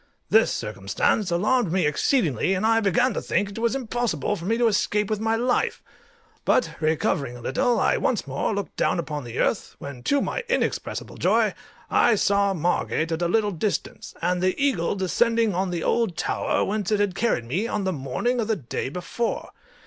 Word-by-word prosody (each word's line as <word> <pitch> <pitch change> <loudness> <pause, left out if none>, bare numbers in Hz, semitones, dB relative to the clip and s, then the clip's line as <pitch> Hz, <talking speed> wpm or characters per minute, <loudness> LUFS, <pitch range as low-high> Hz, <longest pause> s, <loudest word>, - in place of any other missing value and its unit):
This 220 +1 +5
circumstance 105 - -1
alarmed 210 +4 +1
me 185 -2 +2
exceedingly, 160 - +1
and 190 - -1
I 225 0 +4
began 245 +4 +2
to - - -2
think 200 - 0
it 200 - -7
was 235 +2 +1
impossible 240 -4 -1
for 170 -3 -8
me 225 +4 +1
to 240 - +2
escape 210 -1 +1
with 215 - 0
my 225 +1 +1
life; 245 +2 0 0.6
but 165 -10 +2
recovering 155 - 0
a - - -12
little, 235 - +1
I - - +2
once 235 - 0
more 140 +7 -2
looked 200 -1 -4
down - - +1
upon 150 -5 -4
the 120 - -7
earth, - - 0
when, 140 -3 -8
to 285 - +3
my - - -2
inexpressible - - -2
joy, - - +2 0.4
I 235 - +4
saw 200 -1 +2
Margate 165 -1 0
at 165 +1 -2
a 175 - +2
little 210 +3 +2
distance, 200 +3 -3
and 180 +1 +1
the 185 0 +1
eagle 260 -12 +1
descending 225 +3 +1
on 185 +2 0
the 175 -2 -3
old 230 -8 +1
tower - - 0
whence 205 -1 -2
it 210 - +2
had 205 -2 +1
carried 205 - 0
me 175 - -1
on 210 -3 -2
the 190 -1 0
morning 155 - -1
of 220 - 0
the 220 - +1
day 130 - -4
before. 180 - -3
200 Hz, 195 wpm, -24 LUFS, 170-225 Hz, 0.6 s, This